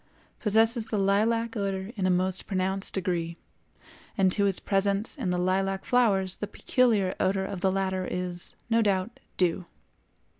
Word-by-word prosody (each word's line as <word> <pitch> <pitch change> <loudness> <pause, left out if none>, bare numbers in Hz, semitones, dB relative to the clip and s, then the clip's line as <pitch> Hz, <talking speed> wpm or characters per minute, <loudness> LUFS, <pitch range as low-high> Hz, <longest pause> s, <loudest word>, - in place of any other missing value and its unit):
possesses 225 +1 +2
the 220 - -2
lilac 220 +4 +1
odor 195 -1 -2
in 190 -3 0
a - - +2
most 185 +1 0
pronounced 190 0 -1
degree, 170 -3 -2 0.8
and 190 -2 +4
to 200 +1 +2
its 195 - -1
presence 200 +2 +1
in 250 -11 -3
the 180 - 0
lilac 190 +2 0
flowers 195 -7 +2
the 205 - -4
peculiar 215 -8 +1
odor 190 0 +1
of 190 -2 -5
the 190 -1 +2
latter 190 -1 -1
is, 180 -1 -5
no 230 0 +3
doubt, 200 +1 0 0.2
due. 180 0 0
195 Hz, 155 wpm, -27 LUFS, 185-210 Hz, 0.8 s, and